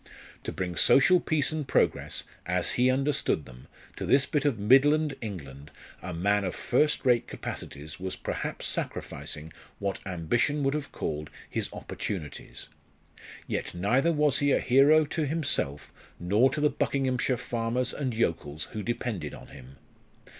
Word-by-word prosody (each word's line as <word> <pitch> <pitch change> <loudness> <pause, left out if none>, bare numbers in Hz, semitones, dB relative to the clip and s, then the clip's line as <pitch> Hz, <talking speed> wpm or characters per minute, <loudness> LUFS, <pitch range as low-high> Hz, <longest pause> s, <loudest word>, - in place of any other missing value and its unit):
To - - -2
bring 90 -2 -3
social 160 - +6
peace 155 -5 +1
and 155 -3 -3
progress, - - +1 0.2
as 90 0 +1
he 125 +1 +3
understood 135 - +1
them, 65 0 -14 0.3
to - - -4
this 135 +1 +4
bit 150 -1 -1
of 140 -6 +2
Midland 140 +8 +4
England 75 -9 -7 0.3
a 90 - -5
man 100 +4 +1
of 90 - -2
first 150 -2 +1
rate 125 -2 +3
capacities 75 +3 -7
was 95 0 -4
perhaps - - -4
sacrificing 75 +1 -4 0.2
what 100 -1 -2
ambition 105 - 0
would 135 0 +2
have 150 -2 -4
called 75 0 -4 0.2
his - - -3
opportunities. 80 -8 -6 0.8
Yet - - -3
neither 125 - +2
was 150 -3 +2
he 145 0 +2
a - - +3
hero 145 +5 +5
to 155 0 -2
himself 140 - -1 0.3
nor 105 +9 +3
to 150 - -3
the 150 0 +3
Buckinghamshire 130 -2 0
farmers 120 +1 -1
and 130 -5 -2
yokels 80 -8 -2
who 110 - -4
depended 105 - -3
on - - -13
him. 65 0 -13
120 Hz, 150 wpm, -28 LUFS, 85-140 Hz, 0.8 s, social